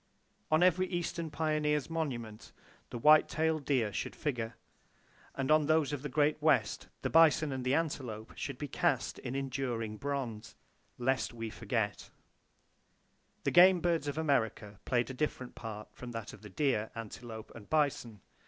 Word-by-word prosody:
On 155 +3 +4
every 185 +1 +4
eastern 170 -2 -3
pioneer's 150 -1 0
monument, 125 -10 -4 0.4
the 120 - -5
white 150 +5 +6
tailed 160 -2 0
deer 120 -8 +1
should - - -3
figure; 120 -6 -3 0.8
and 135 +1 -1
on 155 -1 +5
those 155 -2 +2
of 145 - -3
the 150 - -4
Great 150 +2 +2
West, 155 -3 +2 0.2
the - - 0
bison 160 -2 +5
and 130 -1 -3
the 130 +2 +2
antelope 130 -9 -3
should 140 -3 -5
be 145 - -4
cast - - 0
in 125 - -5
enduring 125 -5 -3
bronze, 120 -5 -4 0.4
"lest 130 0 0
we 115 -1 -5
forget!" - - -2 1.3
The - - +1
game 180 +1 +7
birds 165 -3 0
of 145 - -3
America 110 -9 0
played 125 0 +1
a - - -6
different 130 -2 -3
part 110 -2 -7
from 125 -1 -8
that 115 -2 -6
of - - -13
the 105 - -10
deer, 110 -1 0
antelope 115 0 -8
and 110 -3 -12
bison. 140 -9 0
135 Hz, 160 wpm, -32 LUFS, 115-155 Hz, 1.3 s, game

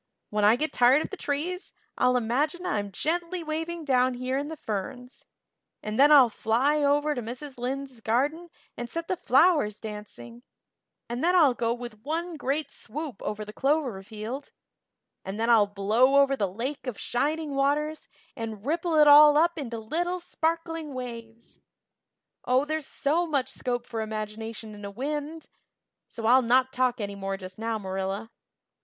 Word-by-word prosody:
When 210 0 0
I 210 +2 +6
get 310 +5 -2
tired 255 +5 +5
of - - -7
the - - -4
trees 345 +4 -3 0.2
I'll 250 0 +3
imagine 285 +10 -1
I'm 205 - -2
gently 340 - -2
waving 325 +1 -4
down 255 -2 +2
here 255 +1 -2
in 285 +2 -1
the 320 - -6
ferns 250 +1 -6 0.6
and 215 +2 -3
then 290 +2 +7
I'll 275 -4 +9
fly 245 +8 +1
over 290 +1 +2
to 250 - -4
Mrs. 250 +3 -8
Lynde's 260 0 -4
garden 290 +10 0 0.3
and 240 0 -6
set 335 +4 -4
the 370 - 0
flowers 270 - +3
dancing 220 +2 -9 0.7
and 240 +3 -4
then 355 +2 +3
I'll 305 -8 +6
go 230 -1 -1
with 240 -3 -6
one 330 +5 -3
great 290 +1 -2
swoop 285 -2 -7
over 210 0 -4
the 210 - -10
clover 270 -6 0
field 220 +7 -7 0.7
and 195 +3 -6
then 230 +1 +2
I'll 215 -3 +6
blow 215 +7 +2
over 275 -1 +4
the 200 -7 -1
Lake 255 +8 -5
of 240 -5 -4
Shining 300 +4 -1
Waters 295 +3 0 0.3
and 220 -2 -6
ripple 330 +2 0
it 300 -1 +6
all 295 0 +9
up 340 +2 +3
into 250 -7 -5
little 345 +11 -2
sparkling 330 -3 -3
waves. 230 -2 -8 0.8
Oh, 255 +3 +2
there's 310 -1 -3
so 330 +5 0
much 275 -4 0
scope 245 -2 -3
for 225 -1 -4
imagination 220 0 -5
in 205 0 -11
a 200 - -5
wind! 295 +7 -4 0.6
So 230 - -6
I'll 250 +3 +6
not 255 +2 +2
talk 255 -1 +1
any 200 -1 -3
more 195 0 -4
just 185 +1 -10
now, 225 0 -1
Marilla." 195 +2 -4
255 Hz, 170 wpm, -27 LUFS, 225-300 Hz, 0.8 s, I'll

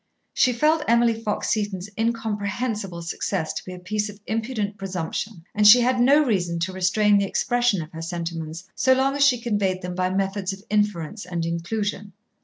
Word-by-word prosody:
She 255 - +3
felt 305 +6 +2
Emily 235 0 +4
Fox 220 -2 -2
Seton's 205 -3 -2
incomprehensible 215 -4 -2
success 165 0 -2
to - - -5
be 185 - -8
a 180 - -7
piece 210 +4 -2
of 205 0 -11
impudent 220 -2 -2
presumption, 190 0 -4
and 210 -1 +4
she 245 +4 +9
had 250 +1 +2
no 285 +5 +5
reason 175 -8 0
to 185 +2 -1
restrain 200 +3 +3
the 200 - +1
expression 240 -5 +1
of 155 - -13
her 160 - -7
sentiments 165 -1 -5
so 260 - +3
long 270 +1 +1
as 285 - +3
she 260 -4 +4
conveyed 205 -5 -1
them 180 0 -4
by 185 0 0
methods 195 0 -1
of 195 +1 -11
inference 205 -2 0
and 175 -2 -3
inclusion. 200 +4 -3
205 Hz, 185 wpm, -24 LUFS, 180-230 Hz, -, she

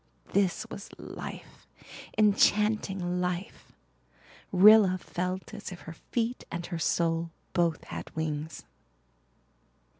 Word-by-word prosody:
This 195 -3 +2
was 200 - -7
life - - -9 0.5
enchanting 205 -3 +3
life. 180 +3 -4 0.8
Rilla 195 0 +7
felt 185 +3 -4
as 210 -2 -7
if 180 - -9
her 165 - -8
feet 235 +8 -3
and 170 0 -4
her 170 -3 -4
soul 165 +1 +1 0.2
both 170 -2 +1
had - - -7
wings. 155 -1 -3
180 Hz, 100 wpm, -29 LUFS, 170-205 Hz, 0.8 s, Rilla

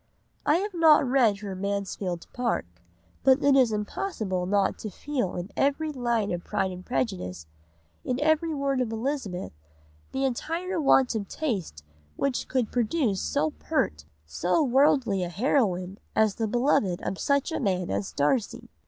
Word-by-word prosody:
I 295 - +5
have 400 +3 -1
not 315 -5 +5
read 235 -6 +3
her 200 -2 -5
Mansfield 190 -2 -3
Park 245 - -1 0.6
but 265 +1 +5
it 280 -1 +5
is 255 -4 +5
impossible 210 - -2
not 200 0 +1
to 215 - -5
feel 250 -2 -3
in 180 +4 -5
every 295 +3 +1
line 235 -6 0
of 175 -1 -3
Pride 195 -2 -1
and 180 0 -8
Prejudice, 180 - -3 0.6
in 250 0 -2
every 315 +2 +2
word 275 -3 0
of 235 -3 -1
Elizabeth, 225 -6 -3 0.6
the 270 0 0
entire 330 +7 -2
want 270 -3 +4
of 210 -3 -3
taste 190 - -3 0.3
which 275 -3 -1
could 255 -4 0
produce 235 - 0
so 295 +2 0
pert, 75 - -1 0.2
so 175 - +1
worldly 260 -6 +3
a 175 - -3
heroine 190 - 0 0.2
as 220 -2 +3
the 225 +1 -2
beloved 220 -6 +2
of 190 - -3
such 280 +3 +1
a - - -1
man 185 -5 0
as 100 0 -2
Darcy. 175 - -1
235 Hz, 155 wpm, -27 LUFS, 190-280 Hz, 0.6 s, I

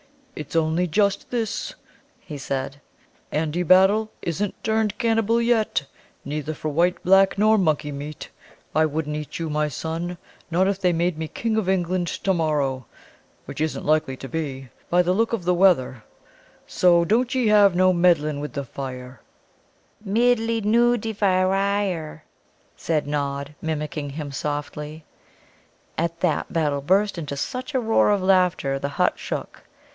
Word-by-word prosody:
"It's 150 +2 -7
only 165 +2 +1
just 200 +3 +1
this," 230 -4 -3 0.4
he 155 -5 -9
said. 135 +1 -4 0.5
"Andy 160 +2 -1
Battle 190 +5 +4
isn't 185 +4 -3
turned 220 -1 0
cannibal 225 0 +2
yet 230 -9 +1 0.4
neither 150 +2 -4
for 155 - -4
white, 170 +4 +1
black, 195 +2 +4
nor 215 +2 +4
monkey 155 -4 0
meat. 145 +1 -7 0.4
I 155 - +3
wouldn't 150 0 -3
eat 150 -1 -6
you, 165 - -3
my 150 0 +1
son, 165 +5 -4 0.3
not 180 +3 +2
if 195 -1 -1
they 180 -2 +3
made 170 -1 0
me 160 - -3
King 225 +6 -2
of 200 -4 0
England 180 -1 0
to 190 - -1
morrow, 145 - -1 0.6
which - - -7
isn't 155 0 -2
likely 150 -3 +1
to 135 - -8
be, 135 -4 -5 0.2
by 180 +1 +4
the 180 +1 +1
look 225 +4 +1
of 220 -6 -1
the 180 - +3
weather, 165 - +3 0.6
so 175 -1 +3
don't 240 +6 +1
ee 255 -2 +1
have 205 -3 +5
no 185 +1 +4
meddlin' 165 -4 +2
with 145 -3 -6
the 140 - -3
fire!" 125 -2 -8 0.8
"Middlinooiddyvire," 205 -6 +1 0.5
said 155 -2 -1
Nod, 140 0 -3
mimicking 150 -2 -3
him 145 0 -6
softly. 150 +2 -5 0.9
And 165 - +1
at 170 0 -6
that 175 -4 0
Battle 150 -4 0
burst 190 +5 +1
into 145 -3 -5
such 255 - -4
a - - +3
roar 225 -3 +3
of 205 -2 +1
laughter 180 -8 +2
the 140 - -3
hut 140 - 0
shook. - - -6
170 Hz, 150 wpm, -23 LUFS, 150-200 Hz, 0.9 s, have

